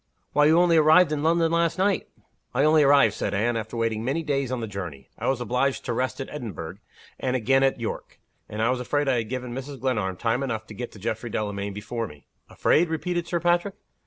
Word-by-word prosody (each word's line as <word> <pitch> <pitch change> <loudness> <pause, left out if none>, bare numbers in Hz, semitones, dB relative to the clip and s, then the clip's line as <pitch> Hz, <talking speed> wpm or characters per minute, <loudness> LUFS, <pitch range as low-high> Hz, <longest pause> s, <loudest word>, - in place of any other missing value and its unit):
"Why, 150 - +4
you 160 +2 +5
only 175 -1 +5
arrived 160 +2 +6
in 150 -1 -1
London 165 +1 +2
last 170 0 +1
night!" 195 0 +1 0.5
"I 135 - +3
only 155 +1 +5
arrived," 140 -6 +5
said 100 - -2
Anne, 115 +4 +1
"after 110 +1 -4
waiting 115 -1 -1
many 140 +7 -1
days 140 -4 -1
on 130 - -1
the 115 - -3
journey. 90 - -7
I - - -2
was 135 -2 +1
obliged 125 +3 0
to 125 - -1
rest 130 +4 -2
at 135 - -4
Edinburgh, 120 - -6 0.4
and 130 -1 -1
again 135 +2 +3
at 135 -2 +2
York 115 - -5 0.3
and 105 +1 -2
I 115 - +3
was 130 - -1
afraid 145 +3 -1
I 130 -2 +2
had 110 -2 -3
given 125 -1 -4
Mrs. 135 +1 -6
Glenarm 105 -8 -1
time 115 +4 0
enough 115 -5 -3
to 110 - -11
get 120 +3 -6
to 105 - -12
Geoffrey 110 +3 -3
Delamayn 100 -2 -3
before 110 +3 -4
me." 75 -5 -15 0.2
"Afraid?" 170 +2 +2
repeated 175 +1 -2
Sir 170 - -1
Patrick. 175 +3 +1
130 Hz, 225 wpm, -25 LUFS, 110-150 Hz, 0.5 s, arrived